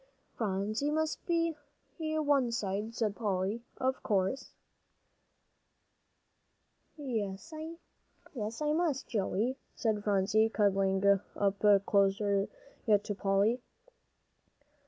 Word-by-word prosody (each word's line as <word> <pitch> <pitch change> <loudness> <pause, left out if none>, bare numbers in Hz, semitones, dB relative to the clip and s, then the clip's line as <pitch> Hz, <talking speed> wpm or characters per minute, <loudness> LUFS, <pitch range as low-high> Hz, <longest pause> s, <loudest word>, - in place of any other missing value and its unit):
"Phronsie 215 +5 -1
must 315 +1 -1
be 335 -1 +2 0.5
one 295 -5 +1
side," 210 0 -2
said 215 -4 0
Polly, 205 0 -1 0.2
"of 260 +1 -1
course." 200 +5 0 2.5
"Yes, 230 - -4
I 300 -5 -6
must, 315 -4 0
Joey," 220 +4 0 0.2
said 215 -3 0
Phronsie, 205 +2 +3
cuddling 195 -2 +2 0.3
up 200 0 +3
closer 200 0 +2 0.4
yet 205 -2 +4
to 210 - -3
Polly. 200 +5 +1
215 Hz, 85 wpm, -32 LUFS, 200-270 Hz, 2.5 s, yet